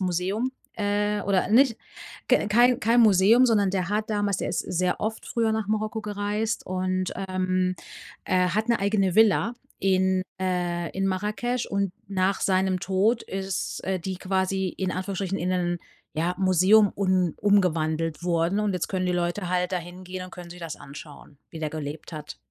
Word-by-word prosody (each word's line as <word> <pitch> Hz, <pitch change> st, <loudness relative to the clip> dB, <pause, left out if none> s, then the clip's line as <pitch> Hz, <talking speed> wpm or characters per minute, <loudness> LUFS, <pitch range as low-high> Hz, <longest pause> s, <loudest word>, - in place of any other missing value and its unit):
Museum, 190 Hz, +7 st, -1 dB, 0.2 s
äh 205 Hz, 0 st, 0 dB
oder 190 Hz, -2 st, +1 dB
nicht 235 Hz, +1 st, +5 dB, 0.5 s
ke 210 Hz, -, +3 dB
kein 240 Hz, +3 st, +4 dB
kein 230 Hz, +3 st, +4 dB
Museum, 215 Hz, +4 st, +6 dB
sondern 210 Hz, -4 st, +3 dB
der 185 Hz, -2 st, -1 dB
hat 215 Hz, +1 st, -1 dB
damals 205 Hz, -2 st, 0 dB
der -, -, -2 dB
ist -, -, -1 dB
sehr 180 Hz, +1 st, -1 dB
oft 220 Hz, +1 st, -3 dB
früher 225 Hz, -2 st, 0 dB
nach 220 Hz, -2 st, -1 dB
Marokko 215 Hz, +1 st, -1 dB
gereist 210 Hz, +2 st, -2 dB
und, 185 Hz, 0 st, -1 dB, 0.2 s
ähm, 185 Hz, 0 st, 0 dB, 0.5 s
äh, 180 Hz, 0 st, +2 dB
hat 215 Hz, +4 st, -1 dB
'ne 235 Hz, -, +3 dB
eigene 195 Hz, -2 st, +1 dB
Villa 220 Hz, +2 st, +4 dB, 0.3 s
in 190 Hz, -1 st, +2 dB, 0.2 s
äh, 175 Hz, -2 st, -1 dB
in 195 Hz, 0 st, +1 dB
Marrakesch 210 Hz, +6 st, -1 dB
und 200 Hz, -2 st, -1 dB, 0.2 s
nach 190 Hz, 0 st, 0 dB
seinem 185 Hz, -1 st, +1 dB
Tod 200 Hz, +5 st, +1 dB
ist, 195 Hz, -1 st, -4 dB
äh, 190 Hz, -1 st, -1 dB
die 185 Hz, +1 st, -4 dB
quasi, 190 Hz, 0 st, -1 dB
in 185 Hz, +1 st, -3 dB
Anführungsstrichen, 190 Hz, +1 st, -3 dB
in 180 Hz, +1 st, -1 dB
einen, 175 Hz, -1 st, 0 dB, 0.4 s
ja, 170 Hz, +3 st, 0 dB
Museum 190 Hz, +3 st, +5 dB
un 185 Hz, -4 st, +1 dB
umgewandelt 165 Hz, -5 st, +1 dB
worden 170 Hz, +3 st, +1 dB
und 210 Hz, -2 st, 0 dB
jetzt 180 Hz, -, -2 dB
können 185 Hz, -1 st, -1 dB
die 180 Hz, -, +1 dB
Leute 175 Hz, +2 st, -1 dB
halt 180 Hz, 0 st, 0 dB
da 180 Hz, -, +1 dB
hingehen 180 Hz, +1 st, -8 dB
und 185 Hz, -, -11 dB
können 180 Hz, -1 st, -9 dB
sich 180 Hz, -, -10 dB
das 165 Hz, -2 st, -6 dB
anschauen, 145 Hz, 0 st, -12 dB
wie 165 Hz, -, -8 dB
der 155 Hz, -, -1 dB
gelebt 155 Hz, +1 st, -6 dB
hat. 150 Hz, -1 st, -8 dB
190 Hz, 175 wpm, -25 LUFS, 180-205 Hz, 0.5 s, Museum